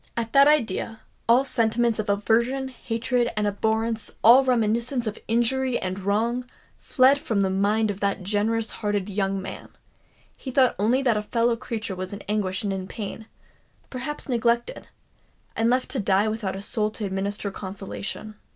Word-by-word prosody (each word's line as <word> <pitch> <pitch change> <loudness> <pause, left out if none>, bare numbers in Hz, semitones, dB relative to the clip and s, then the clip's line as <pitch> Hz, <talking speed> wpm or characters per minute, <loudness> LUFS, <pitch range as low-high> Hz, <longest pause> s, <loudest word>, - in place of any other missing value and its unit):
At 230 -1 -3
that 275 +1 +7
idea, 225 -6 +1 0.3
all 250 +3 +5
sentiments 230 -2 +1
of 210 - -2
aversion, 235 +6 +1
hatred, 240 0 -1
and 210 - +1
abhorrence,—all 220 +4 +3
reminiscence 235 0 +1
of 215 0 -4
injury 240 +2 +1
and 185 +1 -3
wrong, 230 +6 -1 0.3
fled 270 +1 +4
from 215 -7 -1
the 190 -1 +1
mind 205 +3 +1
of 195 - -8
that 200 -1 -1
generous 220 +3 0
hearted 205 -2 -2
young 195 -1 -1
man: 190 - -8 0.7
he 265 - -8
thought 255 -1 +3
only 240 +6 +2
that 240 -5 +2
a - - 0
fellow 230 +2 +1
creature 225 -4 -4
was 185 +1 -5
in 200 - -7
anguish 200 -2 -2
and 200 -1 -1
in 190 -1 -4
pain—perhaps 240 +6 -9
neglected, 235 -1 0 0.7
and 225 +1 +2
left 255 +1 0
to 265 - -2
die 200 0 +2
without 215 -3 -2
a 195 - -6
soul 210 0 0
to 215 0 -5
administer 200 +1 -3
consolation! 195 +2 -6
220 Hz, 160 wpm, -25 LUFS, 200-240 Hz, 0.7 s, that